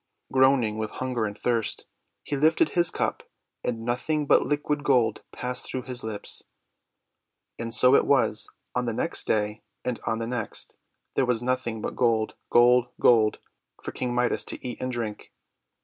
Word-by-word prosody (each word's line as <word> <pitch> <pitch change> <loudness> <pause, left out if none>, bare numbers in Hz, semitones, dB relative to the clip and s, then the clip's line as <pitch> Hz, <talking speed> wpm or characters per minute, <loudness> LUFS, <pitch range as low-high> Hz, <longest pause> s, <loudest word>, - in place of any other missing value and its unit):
Groaning 130 -5 +4
with 110 -1 -2
hunger 125 -3 -1
and 100 0 -7
thirst, 115 -3 -1 0.4
he 145 - -3
lifted 160 - +3
his 175 -2 +2
cup, - - -2 0.4
and 115 -2 -3
nothing 145 +5 0
but - - +5
liquid 145 0 -1
gold 125 -6 +2
passed 125 0 -4
through 130 - -4
his 125 -1 -6
lips. 110 -2 -4 1.2
And 115 0 -4
so 125 +4 +5
it - - +5
was 120 -6 +3 0.2
on - - 0
the - - -1
next - - 0
day, 105 0 0 0.2
and 125 -2 -2
on 110 - +1
the 115 - -3
next; 115 -2 -2 0.4
there 130 - +1
was 120 -1 +1
nothing 120 -3 -1
but - - -3
gold, 115 -3 +1 0.2
gold, 125 +1 +5
gold, 110 -3 +5 0.5
for - - -4
King 125 -1 -3
Midas 125 0 +1
to - - -4
eat 125 - -6
and 130 - -2
drink. 115 -4 -5
125 Hz, 165 wpm, -26 LUFS, 115-130 Hz, 1.2 s, but